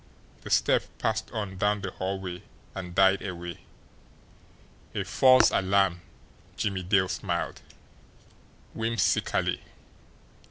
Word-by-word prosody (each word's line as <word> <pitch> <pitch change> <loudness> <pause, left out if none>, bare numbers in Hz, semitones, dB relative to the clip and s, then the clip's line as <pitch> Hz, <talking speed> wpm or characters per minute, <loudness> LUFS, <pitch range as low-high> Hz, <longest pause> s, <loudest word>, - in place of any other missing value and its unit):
The - - -9
step - - +3
passed 110 0 -1
on 105 -5 -5
down 105 0 +1
the 95 -1 -4
hallway 95 -1 -4 0.3
and 90 -2 -7
died 95 0 +5
away. 85 -3 -6 1.4
A - - 0
false 130 -1 +5
alarm! 95 -2 +2 0.6
Jimmie 100 -2 -1
Dale 95 +1 +2
smiled 85 -2 -3 1.1
whimsically. 115 -3 0
95 Hz, 95 wpm, -27 LUFS, 90-105 Hz, 1.4 s, died